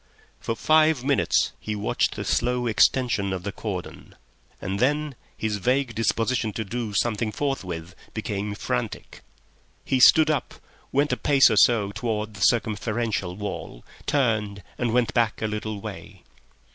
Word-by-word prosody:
For 115 - -3
five 155 -1 +3
minutes 140 0 +2
he 105 - -4
watched 105 - 0
the - - -5
slow 125 +1 0
extension 110 -2 +2
of 95 -2 -4
the 100 - -3
cordon, - - -7 0.4
and 95 +2 -3
then 150 +3 +1 0.2
his 110 -2 -1
vague 125 +4 0
disposition 115 +1 0
to 110 - -3
do 110 0 -4
something 110 0 0
forthwith 95 - -4 0.2
became 105 -1 -3
frantic. 60 -10 -4 0.6
He 130 - +1
stood 155 +5 +7
up, 150 - -2 0.4
went 145 +2 +2
a - - -1
pace 140 -2 +5
or - - +2
so 105 -3 +4
towards 110 -1 -3
the 100 - -10
circumferential 110 -4 -1
wall, 95 -11 -6 0.2
turned, 110 -8 0
and 120 -2 -1
went 120 -1 +1
back 115 -3 +1
a - - -2
little 105 0 -3
way. - - -9
110 Hz, 145 wpm, -25 LUFS, 105-125 Hz, 0.6 s, stood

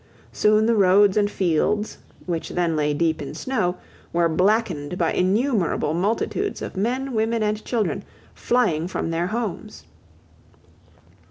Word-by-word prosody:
Soon 215 +1 +3
the 230 - +3
roads 200 -1 +5
and 205 -1 +2
fields, 200 +3 0 0.3
which 170 -3 -3
then 170 -2 0
lay 150 -1 +1
deep 160 +1 0
in 145 +1 -6
snow, 185 -4 -1 0.4
were 170 0 +2
blackened 180 -2 0
by 170 -3 +1
innumerable 195 - +1
multitudes 220 - -1
of - - -6
men, 250 +7 -1
women, 225 0 0
and 210 0 -1
children 230 -4 -1 0.3
flying 175 -10 +1
from 175 -2 -3
their 170 +2 -1
homes. 215 -1 -4
200 Hz, 135 wpm, -23 LUFS, 170-220 Hz, 0.4 s, roads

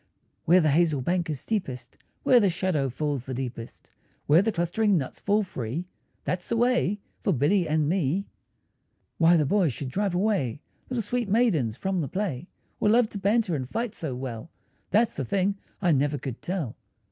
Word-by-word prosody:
Where 180 +3 +6
the 155 -2 +3
hazel 155 -2 +2
bank 175 +4 0
is 150 -4 -2
steepest, 160 - -3 0.3
Where 250 - +6
the 205 -4 +3
shadow 170 -6 0
falls 140 -1 -2
the 130 - -4
deepest, 120 -2 -6 0.3
Where 155 +5 +6
the 220 +2 +1
clustering 190 +3 +1
nuts 135 -5 -4
fall 210 +1 +2
free, 140 - -4 0.4
That's 180 -1 -2
the 230 - 0
way 240 -4 +2 0.2
for - - 0
Billy 170 +5 +2
and 155 -1 +2
me. 180 +2 0 0.9
Why 170 +1 +6
the 150 - +2
boys 175 - +2
should 130 +2 -5
drive 195 +5 -1
away 180 - 0 0.3
Little 250 -3 -1
sweet 240 +1 -2
maidens 180 - +2
from 190 -2 -1
the 145 - -2
play, 180 -5 -3 0.3
Or 210 - +3
love 230 0 +4
to 200 - -5
banter 205 -1 +2
and 130 -3 -4
fight 230 +3 -2
so 155 - -3
well, 125 +2 -6 0.4
That's 225 +2 +3
the 135 - -3
thing 195 - 0 0.2
I 175 - +4
never 145 0 +2
could 130 -2 -6
tell. 170 - -3
175 Hz, 180 wpm, -26 LUFS, 140-205 Hz, 0.9 s, Where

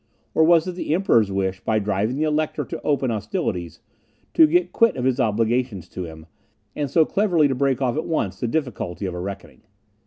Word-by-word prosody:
Or 160 - +4
was 165 +1 +4
it - - -1
the 175 -3 -2
Emperor's 115 - +3
wish, 95 -1 -1
by 110 - 0
driving 105 +3 0
the 150 - -1
Elector 155 0 -1
to - - -6
open 140 -4 0
hostilities, 100 -5 -3 0.5
to 320 - +7
get 350 +3 +2
quit 230 -1 +3
of 125 - -3
his 130 0 +1
obligations 115 -3 0
to 90 - -5
him, 80 -1 -11 0.5
and 145 -2 -2
so 160 +3 +4
cleverly 175 -7 +2
to 135 - 0
break 135 0 0
off 125 -1 0
at 155 - -3
once 155 - -2
the 120 - -1
difficulty 115 - -3
of 90 - -3
a 90 - -5
reckoning? 95 +2 -7
125 Hz, 205 wpm, -22 LUFS, 100-155 Hz, 0.5 s, to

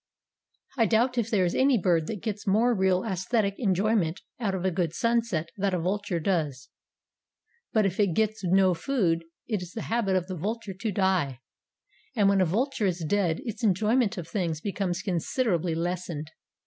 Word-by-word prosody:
I 225 - +5
doubt 245 +2 +2
if 230 -1 -1
there 195 -5 +2
is 175 - 0
any 265 -1 +4
bird 170 -5 +1
that 210 -4 -5
gets 210 -1 -4
more 225 +5 +3
real 190 -3 +2
aesthetic 200 +1 0
enjoyment 195 -4 +1 0.2
out 200 -5 -1
of 185 0 -3
a 190 - +2
good 170 -2 -1
sunset 230 -9 0
than 195 -1 0
a - - -1
vulture 190 +1 -1
does; 155 -7 -1 1.0
but 215 -2 +3
if 190 0 -1
it 195 -6 +2
gets 220 -1 0
no 185 +1 +4
food 170 -4 0 0.2
it 215 -5 -1
is 180 0 -8
the 225 - -4
habit 210 -5 +1
of 185 -2 +1
the 185 0 -5
vulture 210 +4 -4
to 205 +4 -3
die, 180 -9 +1 0.8
and 205 -4 +4
when 200 -1 +3
a - - +4
vulture 220 - 0
is 175 -3 -2
dead 180 -3 +1
its 230 +1 -5
enjoyment 215 +3 +2
of 170 -3 -5
things 170 -7 -2
becomes 190 -1 -2
considerably 180 - 0
lessened. 170 -2 -3
190 Hz, 180 wpm, -27 LUFS, 175-220 Hz, 1.0 s, I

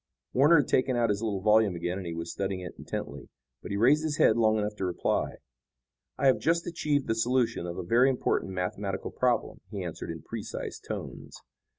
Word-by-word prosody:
Warner 145 +4 +6
had 130 - -7
taken 130 0 +2
out 120 -2 +2
his 100 +1 -2
little 105 -4 -2
volume 105 -2 +4
again 90 +2 -3
and 85 -1 -5
was 85 0 -4
studying 95 -1 -3
it 90 - -7
intently. - - -6 0.3
But - - -8
he 100 - -2
raised 135 +8 +5
his 155 -2 -2
head 110 - +5
long 110 -2 +3
enough 105 0 -1
to 95 - -2
reply. 90 - -1 0.8
"I - - -1
have 130 - +5
just 170 +1 +1
achieved 150 -5 0
the - - +1
solution 120 -5 0
of 85 - -5
a - - -3
very 120 +9 +4
important 125 -6 0
mathematical 95 +2 -3
problem," 125 -3 0
he 100 -3 -5
answered 85 -1 -6
in 80 -2 -6
precise - - -6
tones. - - -7
110 Hz, 200 wpm, -28 LUFS, 95-130 Hz, 0.8 s, Warner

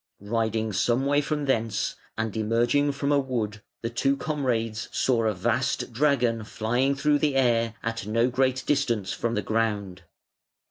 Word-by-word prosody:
Riding 110 0 -1
some 120 +7 +1
way 145 +1 +3
from 150 0 -2
thence 115 -5 0 0.2
and 110 -1 -2
emerging 120 +6 +2
from 140 +1 -1
a 145 - +4
wood, 115 -6 -3 0.2
the 115 - -2
two 135 +4 +1
comrades 120 -8 -2
saw 120 -3 +1
a 110 - +2
vast 120 +6 -1
dragon 120 -4 +2
flying 120 +6 0
through 145 +1 +2
the 145 -2 +1
air 115 -4 +2
at 115 -3 -3
no 115 +3 +2
great 130 +1 +1
distance 120 -9 0
from 115 0 -2
the 105 - -1
ground. 105 -4 -1
120 Hz, 155 wpm, -26 LUFS, 110-135 Hz, 0.2 s, a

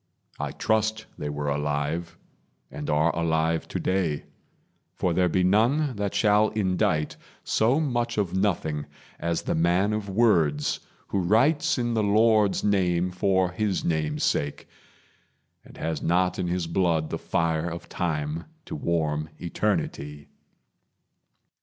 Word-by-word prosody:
I - - -2
trust 110 0 0
they 75 - -3
were 75 0 -3
alive, 75 +3 -2 0.5
and 75 - -6
are 75 +3 +2
alive 80 0 0
Today; 90 -6 -1 0.7
for 90 - 0
there 90 +1 +2
be 90 +2 +1
none 120 +9 +2
that 100 -1 -2
shall 105 0 +4
indite 90 -6 0 0.3
So 120 +7 +2
much 120 -6 -1
of 95 -4 0
nothing 85 -7 0 0.3
as 85 0 -1
the - - -1
man 90 +5 +2
of 105 -1 -3
words 85 -9 +2 0.3
Who 100 - 0
writes 140 - +3
in 120 -1 0
the 110 - +1
Lord's 105 0 +3
name 90 -3 +1
for 95 0 +1
his 100 -1 -1
name's 75 -2 -1
sake 70 0 -1 1.0
And - - -15
has 80 -2 -3
not 90 +2 +1
in 90 - -1
his 90 0 -1
blood 85 -2 0
the - - -2
fire 80 0 0
of 85 +1 -7
time 80 -2 -2 0.2
To 160 - -6
warm 80 - -1
eternity. 75 -3 -2
90 Hz, 135 wpm, -26 LUFS, 80-105 Hz, 1.0 s, shall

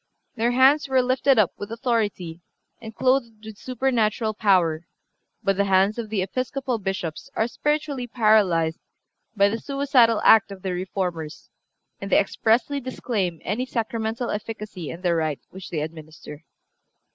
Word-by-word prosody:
(365) 235 - -9
Their 245 +2 +3
hands 290 +1 +2
were 260 -1 +3
lifted 260 +1 +3
up 210 -5 +4
with 205 +2 -7
authority 215 -8 -2 0.4
and 220 -1 -9
clothed 240 -4 0
with 220 -1 -10
supernatural 230 -4 0
power; 175 -6 +2 0.6
but 195 -1 +1
the 200 - +2
hands 195 +3 +2
of 225 -2 -5
the 205 -3 0
Episcopal 255 +4 -3
Bishops 190 -5 -4
are 220 - +1
spiritually 290 -1 -2
paralyzed 200 -9 +2 0.6
by 200 -1 +4
the 225 +3 -2
suicidal 270 -5 +2
act 220 -2 +6
of 190 -2 -10
the 190 -2 -2
Reformers, 180 -3 -4 0.5
and - - -7
they - - +6
expressly 245 +6 +1
disclaim 210 -9 -3
any 245 +6 -2
sacramental 230 0 -2
efficacy 210 -5 -6
in 170 - -8
the 175 -2 +2
rite 155 -3 -1
which 190 0 -10
they 155 -3 -3
administer. 155 0 -9
215 Hz, 150 wpm, -24 LUFS, 185-245 Hz, 0.6 s, act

